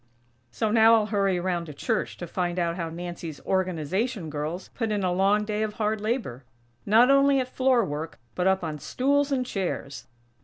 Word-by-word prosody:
So 215 - -1
now 225 0 +6
I'll 220 -2 +2
hurry 195 -3 +1
around 175 -1 -1
to 150 - -9
church - - -2
to 175 - -6
find 175 +1 -2
out 170 -1 0
how 170 -2 -3
Nancy's 170 -2 -7
Organization 185 - -1
girls 155 +5 -4
put 225 -3 -3
in 205 -2 -1
a 180 -1 +1
long 200 +3 +2
day 210 0 -2
of 215 -1 -1
hard 215 0 -1
labor; 215 - -2 0.4
not 230 +5 +6
only 275 0 +5
at 255 - -1
floor 255 -3 +2
work, 155 0 -5 0.2
but 180 +1 0
up 190 -1 +2
on 155 -2 -4
stools 280 - +1
and 255 -2 0
chairs. 180 - -4
195 Hz, 190 wpm, -26 LUFS, 170-225 Hz, 0.4 s, now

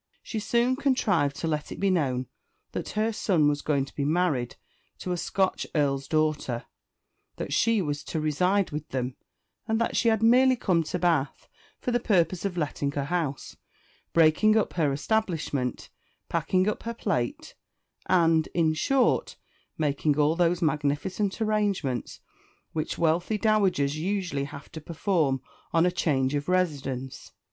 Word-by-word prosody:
She 220 - -4
soon 240 +4 +1
contrived 210 - +1
to 165 - -1
let 150 -2 -2
it - - -7
be 195 -1 +2
known 130 -8 0 0.5
that - - -4
her 220 +1 +1
son 175 -8 +2
was 145 0 +1
going 140 -3 0
to - - -15
be 140 - -2
married 150 -5 0 0.4
to 180 - -5
a - - +1
Scotch 190 +2 -1
Earl's 140 -2 +1
daughter; 155 -6 0 0.7
that - - -4
she 230 -4 +3
was 145 -1 -3
to 160 - -3
reside 180 +6 +1
with 150 +1 -5
them; 130 -1 -3 0.5
and 220 0 +1
that 230 - 0
she 235 - +3
had 220 -1 +1
merely 255 +3 +6
come 185 -8 +1
to 165 - -2
Bath 165 -6 0 0.3
for 250 - -3
the 240 - +2
purpose 185 -5 +1
of 185 -3 -2
letting 145 -3 -1
her 140 -1 -2
house 160 -4 -3 0.6
breaking 170 +7 +4
up 220 - 0
her 155 -5 +1
establishment 150 - -1 0.4
packing 185 +1 +1
up 210 - -1
her 230 0 -5
plate 120 - -2 0.5
and, 165 -3 +3
in 160 -2 +3
short, 265 - +1 0.4
making 150 -1 +1
all 150 +2 +3
those 175 0 +2
magnificent 155 +7 -1
arrangements 205 - -1 0.5
which 155 -1 -3
wealthy 170 +6 +1
dowagers 195 -10 +2
usually 180 -5 -2
have 145 +1 -10
to 160 - -8
perform 155 -5 0 0.3
on 165 +1 +3
a 180 - +2
change 140 -6 0
of 145 +3 -2
residence. 140 -8 -2
165 Hz, 155 wpm, -27 LUFS, 145-200 Hz, 0.7 s, merely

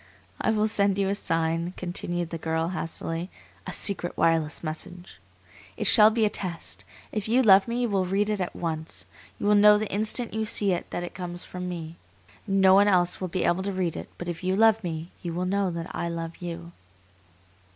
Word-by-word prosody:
"I - - +1
will 215 -1 +2
send 200 -2 +2
you 195 -1 +1
a - - +1
sign," 165 -1 -1
continued 175 -1 -3
the 165 - -4
girl, 160 +1 -1
hastily; 165 0 -4 0.4
"a - - -3
secret 190 -4 +1
wireless 165 -2 +1
message. 175 - -7 0.6
It - - -2
shall 215 0 +7
be 220 0 +1
a - - +2
test. 175 -4 -5 0.3
If 215 -1 -3
you 250 +4 +3
love 195 -2 +6
me 235 +1 -1
you 240 - 0
will 190 -3 0
read 200 +3 +1
it 210 -2 -1
at 180 - -3
once. 160 -1 -4 0.3
You - - -5
will 210 - +4
know 210 0 +7
the 210 -2 -3
instant 220 +3 -1
you 220 0 -2
see 205 -3 +2
it 175 - -2
that 175 - -4
it 175 - -7
comes 175 -1 -6
from 180 0 -6
me. 165 -2 -6 0.5
No 195 -1 +5
one 200 +1 +6
else 180 -3 +2
will 185 - -1
be 180 +1 -2
able 175 +2 +2
to 200 +1 -2
read 185 -4 -1
it; - - -7
but 175 - -6
if 175 +1 -5
you 185 +1 +1
love 220 +1 +4
me, 165 0 -5
you 170 -2 -4
will 180 +1 -1
know 195 +1 +1
that 170 -1 -6
I 170 - -2
love 165 0 -5
you." 170 -1 -7
180 Hz, 215 wpm, -26 LUFS, 170-205 Hz, 0.6 s, shall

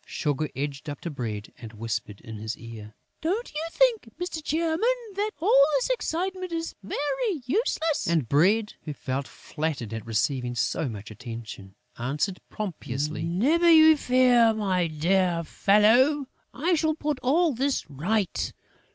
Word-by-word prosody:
Sugar 150 0 -1
edged 140 +2 -4
up 145 - -6
to 170 - -4
Bread 110 -6 -5
and 115 -2 -9
whispered 110 -2 -4
in 110 -1 -8
his 110 +1 -4
ear: 110 -2 -10 0.3
"Don't 390 +9 -2
you 305 +1 -3
think, 475 - +2
Mr. 355 -3 -4
Chairman, 320 +2 0 0.3
that 410 +2 -1
all 320 -5 +6
this 275 - 0
excitement 370 -4 -2
is 330 0 -3
very 310 - -2
useless?" 320 - 0
And 165 -8 +1
Bread, 200 - +3
who 150 - -6
felt 135 0 -4
flattered 150 -8 -4
at 115 -1 -5
receiving 120 +3 -1
so 135 +5 0
much 105 -1 -8
attention, 110 -4 -9 0.2
answered, 145 - -1
pompously: 150 - -4
"Never 260 - +2
you 315 -1 +8
fear, 250 -4 +4
my 185 -5 +1
dear 170 +2 +1
fellow, 235 - +4 0.3
I 340 +6 0
shall 315 -1 +1
put 300 -3 -2
all 310 +5 +2
this 270 +3 -1
right. 180 +8 -1
195 Hz, 145 wpm, -26 LUFS, -, 0.3 s, you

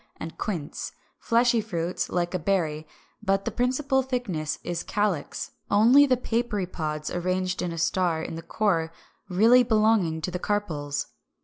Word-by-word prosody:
374), - - -5
and 160 - -9 0.3
quince; 145 - -6 0.3
fleshy 235 0 +3
fruits, 175 -4 -3
like 175 0 -1
a 185 - 0
berry, 160 -4 -1 0.3
but 195 -1 +1
the - - -1
principal 265 +2 +1
thickness 235 - -2
is 175 -1 -3
calyx, 205 -7 -2 0.2
only 240 +8 +6
the 255 -2 +3
papery 230 -5 -1
pods 155 -3 -4
arranged 185 +1 -1
like 180 - -2
a 165 - -6
star 170 -1 +1
in - - -5
the 165 - -5
core 165 -3 0 0.4
really 225 +7 +6
belonging 215 -8 +2
to 160 +3 -3
the 180 - -3
carpels. 160 -9 -2
185 Hz, 155 wpm, -26 LUFS, 165-225 Hz, 0.4 s, only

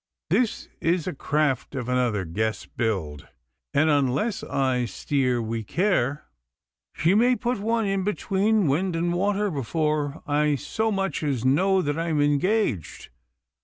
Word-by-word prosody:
This 245 -4 +1
is 170 -1 +1
a 185 - -3
craft 145 -2 -1
of 125 -3 -3
another 125 -6 0
guess 110 +7 -2
build, 85 -11 -3 0.4
and 150 +3 +3
unless 145 - +1
I 130 -2 0
steer 125 +3 0
wi' 115 0 -3
care 150 - 0 0.7
she 165 +4 +2
may 245 +4 +4
put 245 -2 -2
one 225 +2 0
in 195 -1 0
between 205 +1 +1
wind 165 +5 +1
and 170 +1 0
water 200 +2 0
before 150 +1 -1
I 150 -1 +2
so 220 - -2
much 195 -4 -1
as 135 -6 -1
know 185 +8 +3
that 145 +2 -1
I 165 - -1
am 155 -3 0
engaged. 145 - 0
150 Hz, 145 wpm, -25 LUFS, 130-195 Hz, 0.7 s, may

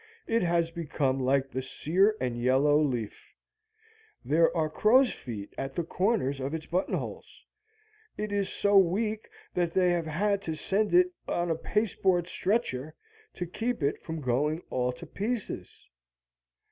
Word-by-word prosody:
It 230 0 +1
has 170 -1 +1
become 145 -5 -1
like 135 +1 +1
the 130 - -2
sear 190 +10 +1
and 125 -2 -1
yellow 135 +5 +3
leaf. 120 -8 -3 0.9
There 165 +3 +4
are 160 -1 +2
crow's 240 - +4
feet 105 -5 -8
at 135 0 -4
the 170 - 0
corners 180 - 0
of 135 +4 -3
its 160 -1 -6
buttonholes. 180 +3 -3 0.7
It 210 -1 -3
is 200 -1 0
so 200 -1 +4
weak 210 +4 0 0.2
that 175 -2 -1
they 180 -1 +4
have 170 -2 0
had 200 +6 0
to 160 -5 -4
send 205 - 0
it 360 0 +5
on 175 -1 0
a - - +1
paste 210 +6 -1
board 175 -3 +3
stretcher 160 - -1 0.4
to 180 - -3
keep 225 +2 -3
it 140 - 0
from 160 -1 -5
going 145 +6 0
all 125 0 0
to 125 - -10
pieces. 220 +1 -5
170 Hz, 155 wpm, -29 LUFS, 140-200 Hz, 0.9 s, it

